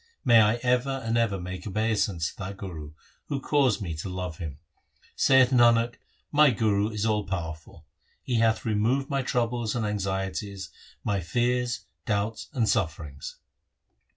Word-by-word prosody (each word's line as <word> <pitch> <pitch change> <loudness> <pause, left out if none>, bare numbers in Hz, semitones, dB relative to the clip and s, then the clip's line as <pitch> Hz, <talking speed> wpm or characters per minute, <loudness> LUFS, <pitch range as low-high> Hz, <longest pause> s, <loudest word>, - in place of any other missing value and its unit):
May 115 -2 +7
I 105 +1 +4
ever 125 +1 +1
and 115 +1 0
ever 115 -5 +1
make 90 +2 -6
obeisance 105 -5 0
to - - -21
that 100 0 -6
Guru 80 -7 -7 0.3
Who 140 - -2
caused 135 -7 +2
me 85 -4 -4
to 85 - -5
love 90 -3 -5
him! 75 -5 -6 0.6
Saith 130 -1 +5
Nanak, 120 -1 +4 0.3
my 150 0 +6
Guru 105 -3 +1
is 105 -1 -2
all 105 -2 +1
powerful; 80 -4 -6 0.4
He 120 -3 0
hath 110 -1 +2
removed 120 +6 +1
my 140 0 +1
troubles 120 -2 -1
and 115 -3 -1
anxieties, 95 -2 -3 0.3
my 100 -1 0
fears, 120 +7 0 0.3
doubts, 105 0 -1
and 120 -7 0
sufferings. 80 - -2
105 Hz, 150 wpm, -27 LUFS, 95-120 Hz, 0.6 s, May